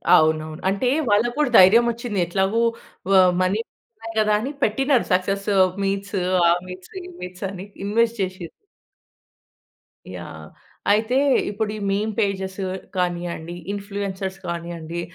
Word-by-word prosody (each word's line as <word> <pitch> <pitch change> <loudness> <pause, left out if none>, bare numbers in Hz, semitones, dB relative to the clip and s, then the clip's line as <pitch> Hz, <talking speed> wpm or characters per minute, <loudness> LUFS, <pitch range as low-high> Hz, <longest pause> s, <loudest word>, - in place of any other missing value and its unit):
అవునవును. 155 0 +1
అంటే 200 +6 0 0.2
వాళ్ళకి 220 +4 +3
కూడా 295 -4 +3
ధైర్యం 215 +6 +7
వచ్చింది. 230 -3 -4
ఎట్లాగో 190 +6 +1 0.5
వ - - +5 0.3
మనీ 185 +4 +1 0.3
ఉన్నాయి 225 0 -9
కదా, 215 0 +2
అని 265 - -3
పెట్టినారు. 270 +3 +2
సక్సెస్ 195 +2 0 0.4
మీట్స్ 195 +1 -2 0.3
ఆ 170 - +6 0.2
మీట్స్, 180 0 -10
ఈ - - -10 0.2
మీట్స్ 180 +1 -6
అని, 190 -1 -8 0.2
ఇన్వెస్ట్ 230 +2 +1
చేశిన్రు. 185 -2 -4 1.6
యాహ్! - - -9 0.4
అయితే, 220 +5 +2 0.3
ఇప్పుడు 210 +1 -2
ఈ - - -6
మీమ్ 210 +2 0
పేజెస్ 190 -2 -1 0.4
కానియండి, 175 -1 -2 0.2
ఇన్‌ఫ్లూయెన్సర్స్ 195 -1 -4
కానియ్యండి, 170 -1 -5
195 Hz, 125 wpm, -22 LUFS, 180-215 Hz, 1.6 s, ధైర్యం